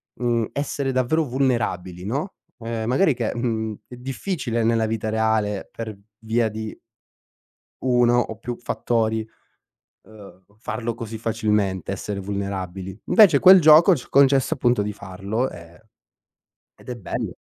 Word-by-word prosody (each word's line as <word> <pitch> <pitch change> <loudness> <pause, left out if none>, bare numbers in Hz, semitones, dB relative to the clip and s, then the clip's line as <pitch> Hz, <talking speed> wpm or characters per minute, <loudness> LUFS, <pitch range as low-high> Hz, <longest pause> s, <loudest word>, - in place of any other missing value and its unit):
mhmm, 120 -2 0
essere 140 -1 -2
davvero 130 +6 +1
vulnerabili, 115 - -1
no, 140 - -3 0.3
ehm, 115 -1 -4
magari 145 +5 +3
che, 120 -3 -2
mhmm, 110 -3 -2
è 125 - -10
difficile 130 -1 -3
nella 115 0 +2
vita 110 0 -3
reale 110 -2 0
per 110 -3 -7 0.2
via 110 0 0
di 110 0 -6 1.1
1 120 -1 +3
o 110 -2 -4
più 120 +1 -6
fattori, 110 -2 -1 0.8
uhm, 100 -3 -15
farlo 115 +1 -4
così 115 -1 -7
facilmente, 105 -5 -1
essere 100 +1 -4
vulnerabili. 95 -1 -5
Invece 200 -10 +6
quel 185 +4 +8
gioco 160 +3 +7
ci 125 - -8
ha - - -21
concesso 135 -1 +4
appunto 120 -4 +1
di 105 0 -3
farlo, 100 +5 -3
ehm, 85 +1 -13 1.0
ed - - -19
è 125 - -3
bello. 100 - -5
115 Hz, 135 wpm, -23 LUFS, 105-125 Hz, 1.1 s, quel